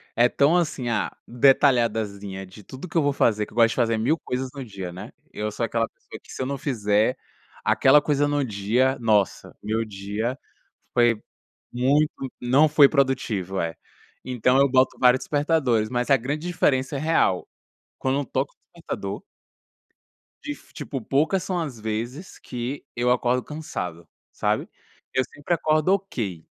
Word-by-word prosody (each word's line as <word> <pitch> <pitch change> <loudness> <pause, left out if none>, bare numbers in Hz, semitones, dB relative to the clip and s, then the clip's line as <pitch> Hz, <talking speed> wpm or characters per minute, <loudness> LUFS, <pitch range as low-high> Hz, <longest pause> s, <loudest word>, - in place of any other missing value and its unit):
é 120 +1 +5
tão 145 +7 +3
assim, 150 -8 -1
ah, 115 - -1
detalhadazinha, 115 -7 +2
de 95 +2 -13
tudo 135 - -9
que 165 - -2
eu 160 - +4
vou 145 -1 +2
fazer, 105 -5 +2
que - - -18
eu - - -16
gosto 115 -1 +5
de - - -3
fazer 115 -2 +1
1000 140 +9 +2
coisas 130 -2 -4
no 135 -2 -7
dia, 95 -5 -7
né. 90 - -9 0.2
Eu 105 0 -3
sou 115 - -4
aquela 115 0 0
pessoa - - -13
que, - - -12
se - - -5
eu 130 - 0
não 140 - -3
fizer 110 -4 +1 0.5
aquela 140 +3 +5
coisa 145 -1 +1
no 145 -1 +1
dia, 120 +5 +1
nossa. 105 -4 +1
Meu 110 +1 -1
dia 105 +4 -3 0.6
foi 120 -2 +3 0.5
muito 140 +5 +2 0.3
não 135 +6 +4
foi 145 -1 +7
produtivo, 120 - 0
é. 85 0 -3 0.5
Então 125 +1 +2
eu 140 - +4
boto 130 0 +3
vários 125 0 +5
despertadores. 145 -7 +1
Mas 125 +1 -1
a 135 - +7
grande 145 +7 -4
diferença 140 -5 +1
é - - -3
real. 155 - +1 0.5
Quando 135 +2 0
toca - - -1
o - - -61 0.2
despertador - - -5 1.2
difi 295 -1 -8
tipo, 135 - -5
poucas 155 - +1
são 185 0 -2
as 145 -8 -5
vezes 115 - -5
que 125 +3 -5
eu 120 +1 +1
acordo 125 0 +1
cansado, 90 - -6 0.2
sabe. - - -1 0.4
Eu 130 - +2
sempre 145 +4 -4
acordo 155 +2 +2
"ok". 115 - -3
125 Hz, 165 wpm, -24 LUFS, 110-145 Hz, 1.2 s, foi